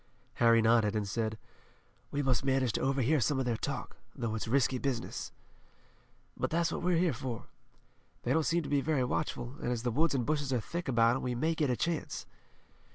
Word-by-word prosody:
Harry 115 Hz, -1 st, +6 dB
nodded, 110 Hz, -2 st, +4 dB
and 105 Hz, -2 st, -1 dB
said: 110 Hz, +1 st, -2 dB, 0.7 s
"We 145 Hz, 0 st, -1 dB
must 130 Hz, -2 st, +2 dB
manage 135 Hz, -3 st, +2 dB
to -, -, -1 dB
overhear 135 Hz, +2 st, +2 dB
some 135 Hz, +3 st, +1 dB
of 130 Hz, -, 0 dB
their 120 Hz, -2 st, +1 dB
talk, 130 Hz, +1 st, -4 dB, 0.2 s
though 115 Hz, -4 st, -2 dB
it's 110 Hz, 0 st, -3 dB
risky 130 Hz, +1 st, +2 dB
business." 125 Hz, -4 st, -3 dB, 1.0 s
"But -, -, -1 dB
that's 170 Hz, +1 st, +1 dB
what -, -, -3 dB
we're 180 Hz, -1 st, +2 dB
here 175 Hz, -2 st, +2 dB
for. 115 Hz, -1 st, -5 dB, 0.8 s
They -, -, +1 dB
don't 160 Hz, -, +3 dB
seem 170 Hz, +2 st, +1 dB
to -, -, -6 dB
be 145 Hz, -1 st, +2 dB
very 145 Hz, -3 st, +1 dB
watchful, 125 Hz, 0 st, -2 dB
and 120 Hz, -, -1 dB
as 120 Hz, -2 st, -2 dB
the 120 Hz, -, 0 dB
woods 155 Hz, +5 st, +2 dB
and 125 Hz, -3 st, 0 dB
bushes 145 Hz, -1 st, 0 dB
are 125 Hz, -, +2 dB
thick 170 Hz, +10 st, -5 dB
about 120 Hz, -1 st, +4 dB
'em -, -, -5 dB
we 125 Hz, -1 st, -2 dB
may 160 Hz, +7 st, +1 dB
get 155 Hz, -3 st, 0 dB
a 125 Hz, -, +2 dB
chance." 170 Hz, -2 st, -2 dB
130 Hz, 210 wpm, -31 LUFS, 115-150 Hz, 1.0 s, Harry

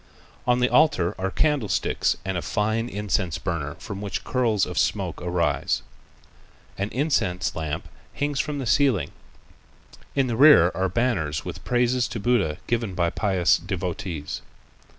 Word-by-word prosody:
On 125 Hz, 0 st, +3 dB
the 125 Hz, -, +4 dB
altar 145 Hz, -, +3 dB
are 95 Hz, +1 st, -1 dB
candlesticks 145 Hz, -2 st, +1 dB
and 95 Hz, -1 st, -2 dB
a 85 Hz, -, -1 dB
fine 110 Hz, +4 st, -1 dB
incense 100 Hz, -5 st, -1 dB
burner 85 Hz, -5 st, -3 dB
from 95 Hz, +2 st, -7 dB
which 100 Hz, -2 st, -4 dB
curls 115 Hz, -6 st, +1 dB
of -, -, -3 dB
smoke -, -, -1 dB
arise. 90 Hz, -1 st, 0 dB, 0.9 s
An 100 Hz, +1 st, -2 dB
immense 110 Hz, -, 0 dB
lamp 80 Hz, -2 st, -4 dB, 0.3 s
hangs 145 Hz, -1 st, -1 dB
from 150 Hz, 0 st, -1 dB
the 135 Hz, -, -3 dB
ceiling. 115 Hz, -, +2 dB, 1.0 s
In 135 Hz, -1 st, +3 dB
the 120 Hz, -2 st, -2 dB
rear 130 Hz, -, +7 dB
are 95 Hz, 0 st, 0 dB
banners 90 Hz, -9 st, 0 dB
with -, -, -7 dB
praises 125 Hz, 0 st, +1 dB
to 115 Hz, -, -5 dB
Buddha 100 Hz, -9 st, +1 dB
given 115 Hz, -5 st, -1 dB
by 85 Hz, -1 st, +1 dB
pious 95 Hz, -4 st, +2 dB
devotees. 90 Hz, -4 st, -4 dB
105 Hz, 145 wpm, -24 LUFS, 90-125 Hz, 1.0 s, rear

